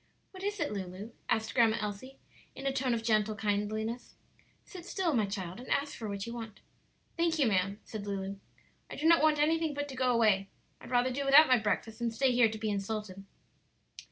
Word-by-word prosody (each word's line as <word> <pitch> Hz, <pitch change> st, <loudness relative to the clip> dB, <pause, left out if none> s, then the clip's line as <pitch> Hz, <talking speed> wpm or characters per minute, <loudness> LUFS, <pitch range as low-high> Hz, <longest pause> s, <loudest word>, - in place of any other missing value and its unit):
"What 375 Hz, -, -11 dB
is 410 Hz, +1 st, -3 dB
it, 295 Hz, -, -1 dB
Lulu?" 195 Hz, +2 st, -6 dB, 0.2 s
asked 220 Hz, 0 st, 0 dB
Grandma 230 Hz, -2 st, +4 dB
Elsie, 210 Hz, +6 st, -6 dB, 0.4 s
in 270 Hz, -, -8 dB
a 275 Hz, -, +1 dB
tone 260 Hz, -2 st, 0 dB
of 225 Hz, -, -4 dB
gentle 215 Hz, -1 st, +2 dB
kindliness. 215 Hz, +3 st, -2 dB, 0.5 s
"Sit 365 Hz, -3 st, -10 dB
still, 360 Hz, -2 st, -1 dB
my 220 Hz, -5 st, +2 dB
child, 190 Hz, -2 st, -5 dB
and 250 Hz, -, -10 dB
ask 285 Hz, +1 st, 0 dB
for 220 Hz, -3 st, -6 dB
what 200 Hz, -1 st, -4 dB
you 235 Hz, -, -6 dB
want." 225 Hz, -3 st, -8 dB, 0.6 s
"Thank 335 Hz, -1 st, +1 dB
you, 285 Hz, -, +3 dB
ma'am," 195 Hz, -1 st, +1 dB
said 210 Hz, -2 st, -7 dB
Lulu. 195 Hz, 0 st, -4 dB, 0.5 s
"I -, -, -7 dB
do 305 Hz, -, -4 dB
not 335 Hz, -1 st, +6 dB
want 310 Hz, -1 st, +4 dB
anything 315 Hz, 0 st, +1 dB
but 290 Hz, 0 st, -3 dB
to 265 Hz, -, -7 dB
go 255 Hz, -1 st, +2 dB
away. 210 Hz, -5 st, +3 dB, 0.3 s
I'd -, -, -12 dB
rather 250 Hz, +1 st, +2 dB
do 280 Hz, +3 st, -2 dB
without 280 Hz, +3 st, +8 dB
my 255 Hz, -2 st, +5 dB
breakfast 220 Hz, +1 st, -2 dB
than 235 Hz, -1 st, 0 dB
stay 255 Hz, +4 st, +1 dB
here 245 Hz, -2 st, +4 dB
to 220 Hz, -, -6 dB
be 215 Hz, -1 st, -2 dB
insulted." 200 Hz, -1 st, -4 dB
230 Hz, 210 wpm, -31 LUFS, 205-275 Hz, 0.6 s, without